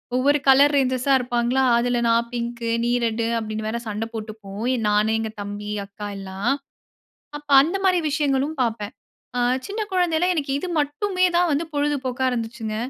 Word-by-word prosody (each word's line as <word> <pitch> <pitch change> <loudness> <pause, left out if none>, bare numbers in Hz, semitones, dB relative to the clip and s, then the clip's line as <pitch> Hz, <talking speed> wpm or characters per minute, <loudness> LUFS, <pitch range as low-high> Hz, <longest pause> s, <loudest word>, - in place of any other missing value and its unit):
ஒவ்வொரு 285 +3 +3
கலர் 280 +2 +6
ரேஞ்சர்ஸா 260 0 +2
இருப்பாங்களா. 245 +1 0
அதில 240 0 +1
"நான் 230 +1 +2
பிங்கு 235 -1 -3 0.2
நீ 240 - +1
ரெட்" 230 0 0
அப்படின்னு 215 0 -4
வேற 235 +2 -2
சண்டை 215 +2 -3
போட்டுப்போம். 215 -1 -7 0.3
நான் 210 +1 +2
எங்க 220 -1 -3
தம்பி 205 +1 -6
அக்கா 205 +1 -8
எல்லாம். 195 +5 -2 0.9
அப்போ 290 -1 -6
அந்த 340 +6 -1
மாதிரி 365 -2 +3
விஷயங்களும் 285 0 0
பார்ப்பேன். 220 -1 -2 0.8
சின்ன 425 +2 -4
குழந்தையில 355 -1 +2
எனக்கு 280 -4 -2
இது 365 - -4
மட்டுமே 365 +6 0
தான் 350 -1 +3
வந்து 300 +4 0
பொழுதுபோக்கா 265 -3 -1
இருந்துச்சுங்க. 225 -2 -4
245 Hz, 150 wpm, -23 LUFS, 220-290 Hz, 0.9 s, கலர்